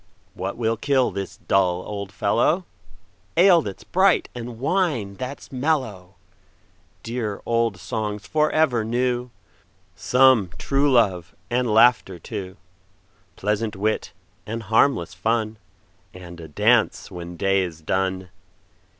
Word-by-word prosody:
What 95 +1 -5
will 115 -1 0
kill 135 +1 +1
this 100 -2 -6
dull 90 -2 +1
old 100 -2 -6
fellow? 120 - +1 0.7
Ale 175 -1 +6
that 100 -9 -7
's - - -13
bright, 190 0 +2
and 120 -1 -7
wine 130 - -1
that 130 +2 -6
's - - -15
mellow! 125 - -2 0.9
Dear 115 -4 -3
old 115 -4 +1
songs 105 +3 -4
for 155 0 +1
ever 140 -8 +2
new; 125 +2 -1 0.7
Some 125 +1 +4
true 140 +1 +1
love, 95 -8 +2 0.2
and 125 -1 +1
laughter 110 -4 +4
too; 95 +2 -7 0.8
Pleasant 105 +1 -1
wit, 105 +3 -1 0.4
and 115 +1 -4
harmless 110 - +2
fun, 110 +3 -1 0.6
And 85 -2 -10
a 80 - -9
dance 110 +10 +2
when 85 -1 -8
day 95 +1 +2
is 85 -3 -5
done. 95 +2 -2
110 Hz, 125 wpm, -23 LUFS, 95-125 Hz, 0.9 s, Ale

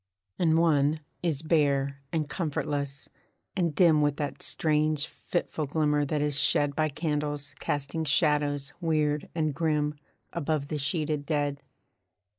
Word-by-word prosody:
And 160 -2 +4
one 155 -2 +3 0.2
is 160 -4 -1
bare, 140 -3 +1
and 155 -2 -1
comfortless, 145 -3 -2 0.5
and 170 -5 0
dim 165 -4 +5
With 145 -1 +2
that 145 -1 -3
strange, 155 -1 +2
fitful 165 -3 -3
glimmer 150 0 +1
that 145 +1 0
is 145 -1 +1
shed 145 -1 +3
By 155 0 +1
candles 145 -1 -2
casting 145 +3 -2
shadows 145 -1 +1
weird 150 -3 +1
and 155 -3 0
grim, 150 -1 +1 0.4
Above 155 -3 -1
the 150 - -2
sheeted 150 0 -1
dead. 145 -2 0
150 Hz, 130 wpm, -28 LUFS, 145-155 Hz, 0.5 s, dim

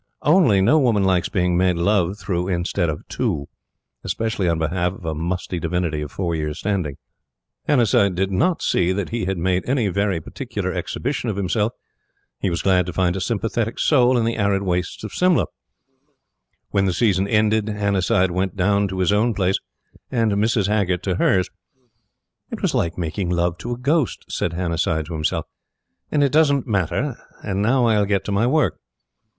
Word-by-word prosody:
only 145 - +4
no 150 +11 +4
woman 115 -7 +2
likes 95 -2 +2
being 90 -2 +1
made 90 0 +2
love 95 +1 +1
through 90 -2 -2
instead 85 -2 -1
of 75 - -5
to 70 0 -2 0.6
specially 110 -5 -1
on 85 - +1
behalf 85 +3 -1
of 95 - -12
a 80 - -1
musty 85 +3 -3
divinity 85 -2 -1
of 75 -1 -6
four 90 -3 -2
years' 75 -2 -3
standing. 95 -9 -2 0.7
Hannasyde 105 -8 +3
did 95 +2 0
not 165 - +1
see 90 +1 +2
that 100 -1 -3
he 115 -4 -2
had 95 0 -2
made 90 +2 +1
any 125 -6 +1
very 100 -1 0
particular 75 - -5
exhibition 135 -2 -3
of 105 - -2
himself. 105 +3 0 0.7
He 95 - 0
was 85 -2 -2
glad 90 -2 +3
to 90 - -4
find 90 0 +1
a 95 - -3
sympathetic 115 +2 -1
soul 125 -4 +4
in 115 - +1
the 115 0 -1
arid 100 -2 +1
wastes 90 +1 -2
of 110 - -6
Simla. 180 -1 +3 1.3
When 100 -1 +2
the 95 - +1
season 100 -2 +2
ended, 110 0 +2
Hannasyde 100 -3 +1
went 95 0 -1
down 100 +2 +2
to 95 -1 -5
his 90 +2 +2
own 110 +2 +2
place 95 -1 +1 0.5
and 115 -4 +1
Mrs. 105 +1 +1
Haggert 95 -3 0
to 90 -3 -1
hers. 95 -2 +2 1.0
"It - - -7
was - - +1
like 85 0 0
making 85 +2 -2
love 85 -1 0
to 120 - -5
a - - -5
ghost," 140 +2 0
said 85 - -2
Hannasyde 85 -2 -1
to 85 - -7
himself, 75 -1 -1 0.7
"and 145 -1 +3
it 140 - +2
doesn't 145 -3 +3
matter; 105 - -1 0.3
and 100 -1 -2
now 125 +4 +3
I'll 105 -3 +3
get 100 -2 0
to - - -3
my 100 +4 +2
work." 155 +3 +1
95 Hz, 180 wpm, -21 LUFS, 90-110 Hz, 1.3 s, only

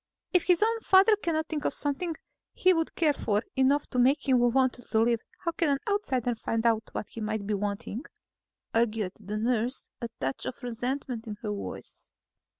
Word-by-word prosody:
"If 360 - +4
his 360 +2 +4
own 455 +1 +2
father 390 +1 +6
cannot 325 -6 -1
think 300 -2 -3
of - - 0
something 315 +4 -2 0.4
he 370 0 +4
would 325 -2 -1
care 310 -4 +3
for 210 -5 0
enough 270 +2 +3
to 250 - 0
make 265 +4 +3
him 260 -2 +5
want 250 +2 +3 0.2
to 220 - +2
live, 230 0 +3 0.3
how 335 - +2
can 330 -2 0
an 280 - +3
outsider 265 - 0
find 225 0 -2
out 225 -2 +2
what - - -4
he 230 - -8
might 215 -1 -2
be 210 - -1
wanting?" 205 +5 -3 0.7
argued 225 -4 +1
the 210 0 -4
nurse, 240 +3 0
a 235 - -3
touch 135 0 -2
of 255 - -6
resentment 245 0 -3
in 210 -1 -5
her 210 - -2
voice. 205 - -7
245 Hz, 190 wpm, -28 LUFS, 220-305 Hz, 0.7 s, father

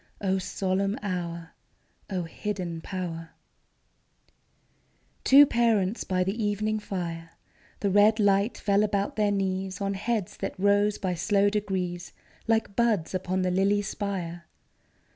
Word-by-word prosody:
O 190 -1 0
solemn 195 +2 -1
hour! 170 -4 -4 0.6
O 185 -3 -2
hidden 175 -1 -4
power! 165 -3 -6 1.9
Two 280 +2 +8
parents 230 -5 +1
by 185 -1 +1
the 200 +5 -2
evening 215 +1 0
fire: 170 -5 -5 0.5
The 200 - +1
red 210 +3 +5
light 200 +2 +2
fell 200 0 +2
about 205 -1 0
their 210 -1 +2
knees 190 -1 -2
On 200 0 -1
heads 210 -1 -2
that - - -5
rose 205 +1 +3
by 185 -2 -2
slow 200 +4 +2
degrees 190 -4 -3 0.3
Like 220 -3 +1
buds 220 -9 +1
upon 185 0 -1
the 180 - +1
lily 200 +2 +2
spire. 185 -5 -4
195 Hz, 125 wpm, -27 LUFS, 185-205 Hz, 1.9 s, Two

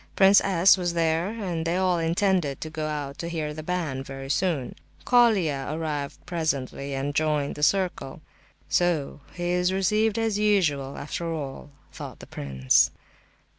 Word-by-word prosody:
Prince 195 +1 +6
S. 190 0 +5
was 175 -2 -2
there; 165 +1 +1
and 190 -7 -3
they 165 +2 0
all 185 -2 +2
intended 165 -3 +1
to 155 - -5
go 155 -1 -3
out 145 -1 -4
to 170 - -4
hear 155 -3 -3
the 155 - -6
band 155 -6 -3
very 135 0 -6
soon. 160 -9 0 0.3
Colia 195 - +3
arrived 150 -2 -4
presently 140 -5 -2
and 140 +2 -2
joined 150 -2 0
the 150 - -8
circle. 180 -4 0 0.5
"So 170 -6 0 0.2
he 175 0 -2
is 180 +1 +2
received 210 +3 +1
as 225 -2 0
usual, 155 -10 +1
after 165 +3 -4
all," 145 -2 -6 0.2
thought - - -8
the - - -10
prince. 65 -2 +2
165 Hz, 155 wpm, -26 LUFS, 145-185 Hz, 0.5 s, Prince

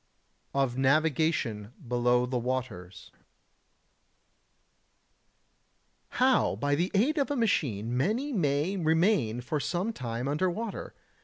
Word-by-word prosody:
[Sidenote: 140 - +2
Of 125 -2 -3
Navigation 135 -6 +1
below 125 0 +2
the 125 0 -2
Waters] 115 -8 -5
80. - - -32 2.9
How - - +3
by 145 +7 -1
the 170 +6 +1
aid 285 +10 +2
of 280 - 0
a 290 - -1
machine 125 - 0
many 230 - 0
may 155 - 0
remain 160 - +2
for 150 +5 -2
some 185 +9 -2
time 120 - -4
under 155 +6 +1
water. 215 +4 -5
140 Hz, 120 wpm, -28 LUFS, 120-185 Hz, 2.9 s, How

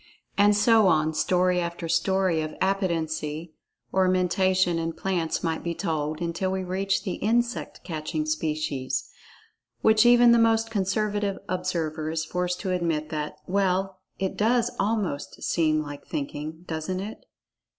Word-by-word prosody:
And 205 0 +5
so 220 -1 +5
on, 155 -2 +3
story 180 +2 +2
after 170 0 -3
story 185 -1 +2
of 155 0 -5
"Appetency" 165 -4 -1 0.4
or 190 -1 +3
Mentation 185 -1 +2
in 165 0 -2
plants 170 -1 -2
might 165 -1 -1
be 170 -1 -2
told, 155 -1 -2
until 170 +2 -1
we 190 0 -2
reach 190 +2 -1
the 185 - -3
insect 235 +2 -1
catching 155 -2 -3
species, 150 -4 -2 0.7
when 220 0 +5
even 240 0 +7
the 235 - +6
most 225 0 +3
conservative 205 0 0
observer 165 -4 -2
is 160 0 -2
forced 180 0 -2
to 190 - -2
admit 165 -4 -1
that: 150 -1 -3
"Well, 190 0 0 0.2
it 190 0 -2
does 235 +2 +2
almost 200 -8 -2
seem 155 -2 +2
like 145 -1 -9
thinking, 150 +3 -5
doesn't 165 +3 -3
it?" 205 +3 -7
180 Hz, 140 wpm, -26 LUFS, 160-195 Hz, 0.7 s, even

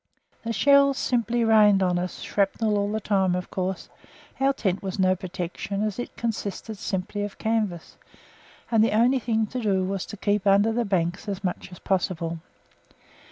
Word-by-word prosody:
The 230 - -2
shells 280 +5 +4
simply 240 -2 0
rained 210 -3 +5
on 180 -1 +1
us, 180 +1 -5
shrapnel 210 +2 0
all 205 0 0
the 220 - -1
time; 190 -3 +1
of 180 0 -5
course 185 0 -3 0.5
our 270 +1 +3
tent 195 -8 -1
was 190 -1 -4
no 185 -1 +3
protection 185 +2 -4
as 215 +1 -2
it 245 - -6
consisted 220 -2 -4
simply 195 +1 -3
of 205 -1 -5
canvas, 215 -7 -2 0.7
and 225 -2 +5
the 225 - +2
only 250 +4 +4
thing 225 -2 0
to 250 +4 -5
do 195 -4 +1
was 195 0 -3
to 210 - -8
keep 205 0 0
under 200 +3 +4
the 235 0 0
banks 185 0 -1
as 200 0 -4
much 185 +1 -4
as 180 - -10
possible. 170 -4 -2
200 Hz, 175 wpm, -25 LUFS, 185-225 Hz, 0.7 s, rained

